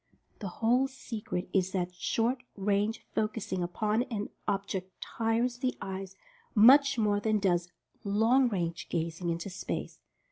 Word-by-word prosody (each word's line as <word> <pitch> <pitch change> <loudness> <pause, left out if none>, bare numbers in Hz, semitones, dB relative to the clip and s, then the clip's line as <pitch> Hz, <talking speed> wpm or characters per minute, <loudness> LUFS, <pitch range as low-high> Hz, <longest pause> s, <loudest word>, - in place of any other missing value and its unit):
The 205 - -4
whole 240 +8 +2
secret 220 -8 -5
is 190 -1 +1
that 180 -2 -1
short 235 +7 0 0.2
range 205 +3 0
focusing 215 -4 -1
upon 210 +6 0
an 210 -4 -3 0.2
object 195 -2 -3
tires 235 +2 -1
the 255 -1 -1
eyes 190 0 -6 0.4
much 275 +5 +7
more 210 -2 +2
than 215 +1 +1
does 175 -3 +1 0.3
"long 225 +6 +3
range" 170 -5 -3
gazing 170 +1 -2
into 170 +3 -3
space. 180 - -5
205 Hz, 135 wpm, -30 LUFS, 185-230 Hz, 0.4 s, much